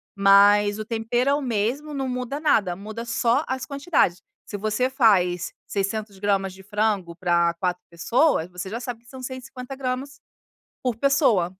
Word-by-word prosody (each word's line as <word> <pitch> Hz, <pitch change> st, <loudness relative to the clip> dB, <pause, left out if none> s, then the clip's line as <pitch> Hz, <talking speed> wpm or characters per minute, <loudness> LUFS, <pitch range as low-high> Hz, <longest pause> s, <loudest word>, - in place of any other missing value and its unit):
mas, 205 Hz, +1 st, +5 dB
o 215 Hz, -, -4 dB
tempero 235 Hz, +3 st, 0 dB
é -, -, +4 dB
o 290 Hz, -, 0 dB
mesmo, 250 Hz, +6 st, -2 dB
não 270 Hz, -2 st, -2 dB
muda 250 Hz, +3 st, -3 dB
nada. 205 Hz, -, +2 dB
Muda 215 Hz, +5 st, -7 dB
só 235 Hz, +5 st, +1 dB
as 260 Hz, -1 st, -3 dB
quantidades. 280 Hz, -, 0 dB, 0.2 s
Se 205 Hz, -, -6 dB
você 215 Hz, +5 st, 0 dB
faz 185 Hz, -, +2 dB
600 200 Hz, 0 st, -3 dB
gramas 195 Hz, -2 st, 0 dB
de 190 Hz, 0 st, -14 dB
frango 205 Hz, -4 st, -1 dB
pra 170 Hz, -1 st, +2 dB
4 180 Hz, -1 st, -1 dB
pessoas, 180 Hz, -, +1 dB
você 180 Hz, +2 st, -6 dB
já 230 Hz, +3 st, -4 dB
sabe 245 Hz, -2 st, -6 dB
que 240 Hz, -, -19 dB
são 260 Hz, -1 st, -10 dB
150 260 Hz, 0 st, -7 dB
gramas 265 Hz, +1 st, -4 dB, 0.6 s
por 250 Hz, -3 st, -1 dB
pessoa. 245 Hz, -, +3 dB
220 Hz, 165 wpm, -24 LUFS, 195-260 Hz, 0.6 s, mas